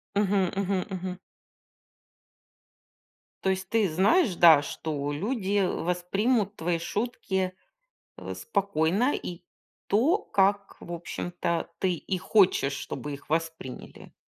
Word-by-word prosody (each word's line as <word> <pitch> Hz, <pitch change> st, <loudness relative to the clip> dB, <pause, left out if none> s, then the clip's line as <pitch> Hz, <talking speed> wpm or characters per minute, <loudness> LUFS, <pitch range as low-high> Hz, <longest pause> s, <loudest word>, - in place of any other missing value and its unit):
Мгм, 200 Hz, -2 st, +2 dB
мгм, 195 Hz, -1 st, 0 dB
мгм. 185 Hz, -1 st, -4 dB, 2.3 s
То 190 Hz, -, +2 dB
есть 190 Hz, 0 st, -2 dB
ты 220 Hz, -5 st, +2 dB
знаешь, 195 Hz, -, +3 dB
да, 160 Hz, -4 st, +8 dB
что 145 Hz, 0 st, -4 dB
люди, 200 Hz, -, -1 dB
э, 190 Hz, -, +3 dB
воспримут 195 Hz, +6 st, 0 dB
твои 170 Hz, -1 st, -1 dB
шутки, 190 Hz, -1 st, -2 dB, 0.6 s
э, -, -, -6 dB
спокойно 200 Hz, -, +1 dB
и 175 Hz, 0 st, -6 dB, 0.4 s
то, 260 Hz, -, +3 dB
как, 200 Hz, -, +1 dB
в -, -, -9 dB
общем-то, 175 Hz, 0 st, -3 dB
ты 185 Hz, -2 st, +1 dB
и 185 Hz, +3 st, -3 dB
хочешь, 180 Hz, -8 st, +3 dB
чтобы 145 Hz, +1 st, -5 dB
их 140 Hz, +1 st, -11 dB
восприняли. 160 Hz, -5 st, -4 dB
185 Hz, 115 wpm, -27 LUFS, 170-200 Hz, 2.3 s, да